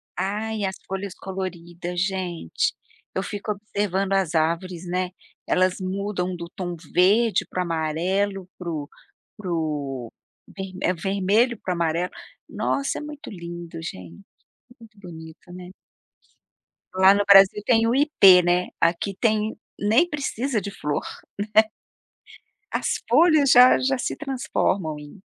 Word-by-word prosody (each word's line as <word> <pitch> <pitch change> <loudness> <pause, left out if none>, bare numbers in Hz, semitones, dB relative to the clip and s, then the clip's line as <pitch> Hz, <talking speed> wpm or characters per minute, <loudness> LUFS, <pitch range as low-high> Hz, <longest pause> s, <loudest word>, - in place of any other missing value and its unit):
Ai 210 +3 -2
as 190 0 -3
folhas 195 0 -4
coloridas 175 -2 -6
gente, 185 - -1 0.4
eu 190 - -1
fico 205 +1 -4
observando 200 -2 -2
as 190 -4 +1
árvores, 170 +2 -1
né, 180 +1 -1 0.4
elas 185 0 +2
mudam 185 -1 -3
do 170 -1 -7
tom 175 -2 -4 0.2
verde 210 +5 +3
para 185 - -2
amarelo 180 +4 -1
para 175 -2 -6
o 150 -3 -4 0.5
para 190 -4 -5
o 145 -7 -3 0.7
é 180 - +2
vermelho 200 +6 +1
para 185 - -3
o - - -4
amarelo, 170 +1 0 0.4
nossa 275 0 -1
é - - -8
muito 295 -1 -8
lindo 170 -2 -8
gente, 90 - -9 0.6
muito 220 -2 -17
bonito, 160 -1 -12
né. 180 0 -9 1.3
Lá 190 +1 +7
no 205 0 +2
Brasil 195 +1 +7
tem 230 -2 +3
o 235 - +2
ipê, 200 -11 +7
né, 175 +1 +1
aqui 175 +4 +1
tem 215 -1 +1 0.2
nem 225 +12 +3
precisa 275 -5 -2
de 200 - -6
flor, 150 -6 -3 1.5
né. - - -56
As - - -1
folhas 300 +2 +5
já 250 0 +8
já 265 +1 +1
se - - -2
transformam 245 - -1
em 150 +6 -12
190 Hz, 135 wpm, -24 LUFS, 170-210 Hz, 1.5 s, já